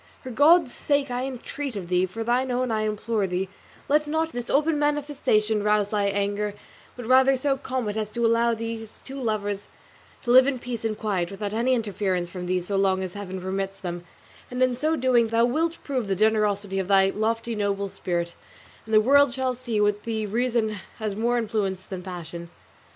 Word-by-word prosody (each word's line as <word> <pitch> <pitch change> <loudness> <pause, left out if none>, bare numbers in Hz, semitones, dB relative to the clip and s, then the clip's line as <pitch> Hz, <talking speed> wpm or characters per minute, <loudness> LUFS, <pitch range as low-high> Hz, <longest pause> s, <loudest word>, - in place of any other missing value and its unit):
For 255 - -6
God's 290 +3 +5
sake 285 -3 0
I 250 +1 -1
entreat 270 0 -5
of 190 -4 -5
thee, 180 +1 +2
for 225 +5 -5
thine 245 +3 +1
own 250 0 0
I 215 -1 0
implore 215 -1 -1
thee, 185 +1 -2 0.4
let 300 +1 +2
not 320 +2 0
this 245 -3 -5
open 300 +1 +2
manifestation 285 -8 +1
rouse 210 -1 +2
thy 205 -1 0
anger; 200 +1 -1 0.4
but 245 - -7
rather 260 +2 +5
so 275 +1 +1
calm 260 -3 -3
it 205 - -2
as 215 -1 -2
to 235 +2 -1
allow 230 0 +3
these 225 -1 -6
two 270 0 -8
lovers 205 -3 -2 0.6
to 240 - 0
live 255 +2 +8
in 280 -2 0
peace 240 -2 -5
and 220 -2 -1
quiet 190 -5 -1
without 200 +1 -4
any 245 +4 +2
interference 195 -5 -1
from 180 0 -6
thee 180 0 +1
so 195 +3 -2
long 190 -1 +2
as 185 -1 -5
Heaven 190 -2 -6
permits 195 +1 -3
them; 175 -2 -5 0.5
and 250 +1 0
in 255 -1 +2
so 310 +6 +1
doing 245 -4 +3
thou 230 +1 +3
wilt 325 +7 0
prove 255 -6 -2
the 195 - 0
generosity 205 -2 +1
of 190 - -2
thy 195 -1 +5
lofty 230 +2 -1
noble 200 -2 -1
spirit, 170 -2 -3 0.5
and 220 - +1
the 215 - +7
world 280 +3 +5
shall 260 -1 0
see 240 -3 -4
that 210 - +3
with 205 0 +1
thee 220 -2 -2
reason 230 +1 0 0.3
has 215 -3 -3
more 235 +3 +1
influence 205 -5 -1
than 185 -1 -7
passion." 170 -2 -7
220 Hz, 200 wpm, -25 LUFS, 200-255 Hz, 0.6 s, live